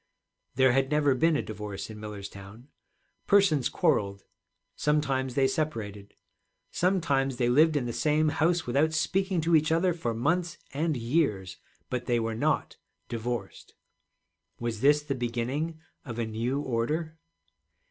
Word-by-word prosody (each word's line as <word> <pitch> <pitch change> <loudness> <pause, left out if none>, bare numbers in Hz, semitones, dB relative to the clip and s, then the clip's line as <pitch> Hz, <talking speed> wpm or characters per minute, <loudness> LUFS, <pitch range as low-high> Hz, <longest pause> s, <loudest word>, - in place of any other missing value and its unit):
There 130 0 +5
had 135 +1 +2
never 150 -2 +3
been 160 +5 +2
a - - 0
divorce 105 -1 -6
in 105 - -9
Millerstown; 105 +3 -9 0.6
persons 190 -9 +4
quarreled, 100 -1 0 0.5
sometimes 135 -4 0
they 135 -1 +4
separated, 110 -9 -4 0.6
sometimes 145 -8 +1
they 120 -1 +1
lived 155 +5 +4
in 140 -4 0
the 120 - -3
same 155 +3 +2
house 170 +3 +1
without 145 +6 +1
speaking 190 +2 0
to 165 +1 +3
each 155 0 +3
other 175 +2 +3
for 120 -9 -3
months 170 +7 0 0.2
and 155 +1 0
years, 115 - 0 0.3
but 125 -1 -3
they 120 -2 +2
were 115 0 -2
not 110 - -1 0.3
divorced. 120 +1 -5 0.8
Was 115 -2 -3
this 145 +2 +4
the 145 -2 -2
beginning 130 +6 -2 0.2
of 120 -4 -7
a 115 - -1
new 115 +5 -2
order? 155 +6 -2
135 Hz, 140 wpm, -28 LUFS, 115-155 Hz, 0.8 s, There